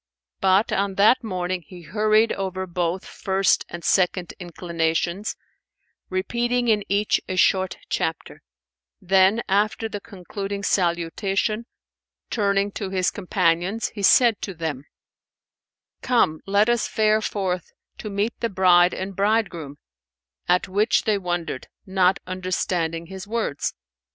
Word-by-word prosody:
But, 190 +3 +3
on 195 0 0
that 220 +6 +4
morning 185 -3 -2
he 175 +2 -13
hurried 215 +5 +2
over 190 -1 -3
both 175 0 -2
first 190 0 +1
and 175 0 -8
second 180 -2 +1
inclinations, 170 +2 -2 0.7
repeating 240 +6 0
in 210 -2 +3
each 205 +1 +2
a 185 - -2
short 185 0 +2
chapter; - - -3 0.6
then, 195 +3 +3
after 210 +3 +1
the 205 -2 -6
concluding 200 +1 -6
salutation, 195 +5 0 0.6
turning 200 -2 +1
to 200 -1 -5
his 185 -1 +1
companions, 180 +4 0
he 205 - -8
said 230 +2 +5
to 195 - -5
them, 155 -4 -4 1.2
"Come, 190 -11 +2
let 200 +2 +3
us 240 -1 +1
fare 215 0 +2
forth 185 -4 -2 0.3
to 215 - -5
meet 205 +3 -1
the 230 - -1
bride 180 -2 +4
and 190 +1 -5
bridegroom"; 195 -8 0 0.7
at 180 0 +3
which 205 +4 +2
they 210 -2 +1
wondered, 175 -7 -3 0.2
not 190 0 +2
understanding 180 -2 -2
his 190 +3 -9
words. 215 -10 -2
190 Hz, 125 wpm, -23 LUFS, 180-210 Hz, 1.2 s, said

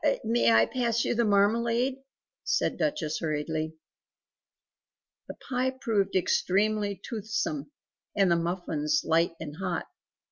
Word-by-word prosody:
"May 220 - +3
I 110 0 +6
pass 235 - 0
you - - +1
the 235 0 +2
marmalade?" 230 +5 +2 0.5
said - - 0
Duchess 160 - -1
hurriedly. 155 0 -2 1.5
The - - -7
pie 255 0 0
proved 200 -6 0
extremely 200 +2 +1
toothsome, 235 +7 -3 0.5
and 195 -3 +4
the - - +5
muffins 165 -3 -1
light 165 +1 +2
and 150 -1 -7
hot. 180 -3 -2
200 Hz, 115 wpm, -28 LUFS, 160-235 Hz, 1.5 s, I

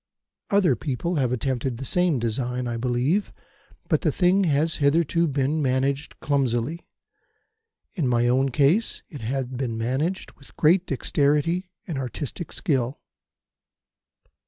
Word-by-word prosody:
Other 190 -9 +3
people 155 +7 -2
have 130 -4 +1
attempted 125 0 -1
the 135 - -6
same 180 0 +2
design, 125 +2 -2
I 120 - -2
believe, 125 - 0 0.6
but 155 -4 +2
the 155 - +2
thing 185 +4 +3
has 155 +1 +1
hitherto 165 +3 +2
been 140 +2 0
managed 135 +2 -1
clumsily. 140 +2 -1 1.1
In 165 - -1
my 120 -1 +2
own 130 +2 +3
case, 150 - +2
it 145 -6 -9
has 130 +4 -2
been 125 -2 -4
managed 135 +11 -2
with 135 - -21
great 175 +4 +4
dexterity 150 +6 +1 0.2
and 160 -7 -4
artistic 135 +6 -5
skill. 130 -3 -1
140 Hz, 130 wpm, -24 LUFS, 125-165 Hz, 1.1 s, great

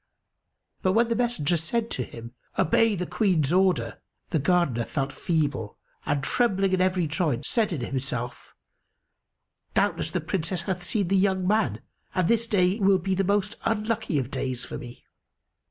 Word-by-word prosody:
But 185 - +2
when 230 +2 +3
the 230 - +1
messenger 230 -10 +1
said 225 +9 -1
to 125 - -1
him, 115 0 -10 0.2
"Obey 225 +6 +3
the 180 -1 -2
Queen's 175 -8 +1
order," 185 0 +2 0.3
the 160 - +1
Gardener 145 -6 +2
felt 135 -2 -2
feeble 150 - -1 0.3
and, 145 -1 0
trembling 195 - +2
in 185 - +2
every 185 -2 +2
joint, 150 -4 -1
said 225 -4 +1
in 155 -7 -3
himself, 125 -1 -4 1.2
"Doubtless, - - +1
the - - -1
Princess 175 -1 -2
hath 185 -2 -3
seen 185 0 0
the 195 - +3
young 190 -1 +2
man, 195 - +1 0.3
and 185 -2 +2
this 230 +2 +2
day 190 -1 +2
will 195 -1 +5
be 190 +1 -1
the 195 +1 +1
most 205 +2 +1
unlucky 220 -5 0
of 130 -2 -2
days 130 -2 -3
for - - -6
me." 120 0 -11
180 Hz, 165 wpm, -26 LUFS, 145-205 Hz, 1.2 s, will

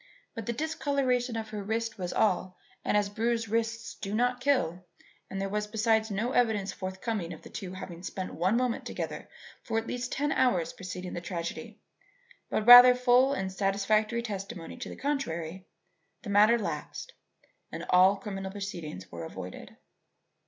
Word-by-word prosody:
But 225 -4 -7
the - - +1
discoloration 260 -4 0
of 220 -1 -5
her 210 -1 -5
wrists 225 +1 -2
was 180 -1 -3
all, 185 -3 +1 0.3
and - - +2
as 205 -1 +2
bruised 230 +2 -1
wrists 225 0 -1
do 200 +1 -5
not 245 +2 +1
kill 220 - +1 0.5
and 195 - -4
there 195 - -1
was 210 +1 -2
besides 220 0 +1
no 215 +5 -1
evidence 220 -6 +1
forthcoming 190 -1 -4
of 160 - -9
the - - -12
two 185 -2 -6
having 175 -2 -8
spent 185 0 -5
one 185 +7 +1
moment 250 -2 0
together - - -5 0.3
for 225 - -2
at 225 - -1
least 245 +1 -4
ten 290 +1 0
hours 180 -10 +2
preceding 185 -1 -7
the 175 - -4
tragedy 170 -1 -6 0.7
but 215 - -1
rather 245 +1 +11
full 250 +2 +4
and 190 -8 -2
satisfactory 210 +4 +1
testimony 195 -6 -6
to - - -7
the - - -7
contrary, 185 - -3 0.6
the 205 - -5
matter 210 +4 +6
lapsed 235 - -5 0.6
and - - -6
all 185 +2 +6
criminal 195 -1 -5
proceedings 170 - -6
were 85 -1 -6
avoided. 80 - -8
210 Hz, 165 wpm, -29 LUFS, 185-235 Hz, 0.7 s, rather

